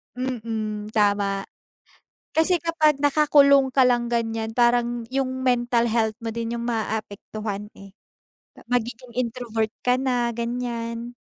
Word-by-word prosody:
Mm, 220 -4 -3
tama. 200 -1 +2 0.9
Kasi 335 +2 +3
kapag 310 -4 +2
nakakulong 280 -2 +5
ka 265 - +4
lang 240 -1 +2
ganiyan, 225 -1 -1
parang 240 -1 +2
yung 260 -1 -1
mental 240 -1 +2
health 220 -1 +1
mo 225 - -2
din 230 +1 -3
yung 235 0 -4
maapektuhan, 215 -2 -4
eh. 195 0 -13 0.6
Pa - - -16
magiging 240 0 -3
introvert 230 -3 -2
ka 250 0 +4
na, 245 -2 0
ganiyan. 235 0 -4
235 Hz, 120 wpm, -24 LUFS, 225-255 Hz, 0.9 s, nakakulong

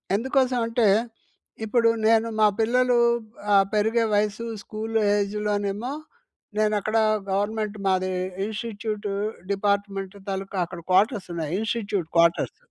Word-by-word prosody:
ఎందుకోసం 255 +2 +1
అంటే, 230 -1 +2 0.8
ఇప్పుడు 230 +1 +3 0.2
నేను 225 0 +4
మా 215 - +7
పిల్లలు 245 +2 +3 0.5
అహ్, 195 -1 +6
పెరిగే 220 +2 +2
వయసు 210 +2 0 0.2
స్కూలు 220 +1 -2 0.2
ఏజ్‌లోనేమో 205 +3 -1 0.6
నేనక్కడ 215 0 +1 0.3
గవర్నమెంట్ 210 +2 -1
మాది 185 0 +1 0.4
ఇన్‌స్టిట్యూట్ 215 -1 -4 0.4
డిపార్ట్మెంట్ 200 -1 -1
తాలూకా 195 0 -4
అక్కడ 175 0 -9
క్వార్టర్స్ 200 +2 +3
ఉన్నాయి. 160 -3 -3
Institute 205 -5 -2
quarters. 170 0 +3
210 Hz, 105 wpm, -25 LUFS, 200-225 Hz, 0.8 s, మా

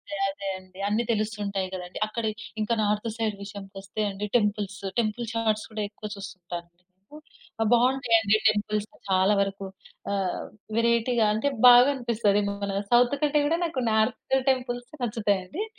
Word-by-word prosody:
అదే, 200 - -7
అదే 195 0 -6
అండి. 185 0 -15
అన్ని 220 +3 +1
తెలుస్తూ 215 -1 -1
ఉంటాయి 195 -2 -2
కదండీ! 180 -1 -6
అక్కడ 225 +1 -4 0.4
ఇంకా 215 +2 +1
నార్త్ 210 +2 0
సైడ్ 220 -3 -1
విషయానికి 200 -1 -9
వస్తే 195 +2 -6
అండి 200 +2 -4
టెంపుల్స్. 205 -2 -1 0.2
టెంపుల్ 230 +1 -2
షార్ట్స్ 220 -2 0
కూడా 215 -1 -3
ఎక్కువ 210 0 -8
చూస్తుంటాను. 180 -3 -8 0.9
ఆహ్, 220 - +2
బాగుంటాయి 245 -1 +4
అండి 210 0 +3
టెంపుల్స్ 210 0 0 0.2
చాలా 190 +2 +4
వరకు. 195 0 -2 0.5
ఆహ్, 195 -2 -1 0.3
వేరైటీగా 235 0 +2
అంటే 225 +6 +1 0.2
బాగనిపిస్తదేమో 235 -6 +5
మన 200 0 -1
సౌత్ 245 +3 +5
కంటే 295 0 +3
కూడా 330 +3 +1 0.3
నార్త్ 220 +4 +1
టెంపుల్సే 245 +1 -2
నచ్చుతాయండి. 210 - -1
215 Hz, 140 wpm, -26 LUFS, 200-235 Hz, 0.9 s, బాగనిపిస్తదేమో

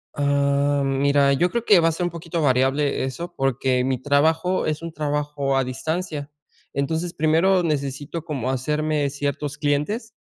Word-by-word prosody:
Ah, 140 0 +1
mira, 140 +1 +3
yo 175 +6 +2
creo 235 +4 -2
que 200 -4 +6
va 165 - +3
a - - +3
ser 165 +3 -3
un 175 - -1
poquito 170 0 -5
variable 135 +2 +2
eso 170 +7 -5
porque 130 -1 +1
mi 130 0 0
trabajo 160 +6 +1
es 155 +1 -2
un 165 -1 -6
trabajo 145 -2 -1
a 135 - +2
distancia, 150 +3 -4 0.4
entonces 160 +5 -2
primero 165 +4 +3
necesito 145 0 -3
como 135 -6 -3
hacerme 150 +2 0
ciertos 145 +1 -3
clientes, 155 - -1
145 Hz, 160 wpm, -23 LUFS, 140-165 Hz, 0.4 s, que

